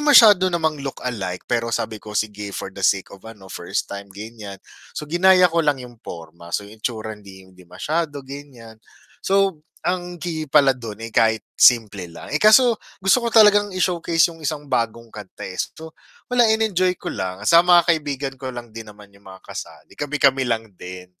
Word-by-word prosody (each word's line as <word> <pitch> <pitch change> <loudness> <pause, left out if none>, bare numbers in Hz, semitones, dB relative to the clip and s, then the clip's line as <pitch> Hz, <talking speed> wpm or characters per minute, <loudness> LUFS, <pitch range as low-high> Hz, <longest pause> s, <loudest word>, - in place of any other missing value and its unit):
masyado 215 -11 +7
namang 160 -4 -1
look-like 115 -9 -5
pero 115 -1 -1
sabi 115 -2 -3
ko, 105 -1 -7
sige, 105 -2 -3
for 95 - -6
the 100 - -10
sake 95 0 +1
of 100 - -13
ano, 95 -4 -12
first - - -3
time, 100 0 -8
ganiyan. 105 0 -9 0.4
So - - -4
ginaya 180 +4 +4
ko 170 - +2
lang 145 -3 +1
yung 125 -3 -12
porma, 85 -2 -10
so 105 - -6
yung 105 +2 -15
itsura 110 -2 -4
hindi 100 -2 -13
hindi 90 -1 -19
masyado 145 - -3
ganiyan. 130 -5 -11 0.4
So 195 -4 +1 0.3
ang 180 -1 -2
key 160 -3 -5
pala 140 -3 +5
do'n, 115 -4 -8
eh, 115 0 -8
kahit 110 -1 +2
simple 105 -7 +3
lang. 85 - -11
Eh, 155 - 0
kaso 230 +3 +6 0.2
gusto 195 +6 +3
ko 235 - -1
talagang 205 -2 +6
i-showcase 170 -2 +1
yung 165 - -16
isang 150 0 -3
bagong 115 -3 -2
kanta, 105 -3 -9
eh, 95 - -8
so 160 +11 -6 0.3
wala 245 -1 +3
in-enjoy 190 -5 +1
ko - - -13
lang 95 0 -4
saka 170 +8 +7
mga 175 -1 +6
kaibigan 145 -5 -1
ko 130 0 -6
lang 120 -3 -9
din 115 -2 -8
naman 105 -1 -17
yung 100 -1 -15
mga 95 - -12
kasali, - - -9
kami-kami 140 -2 +1
lang 115 -4 -3
din, 90 0 -9
125 Hz, 185 wpm, -21 LUFS, 105-170 Hz, 0.4 s, masyado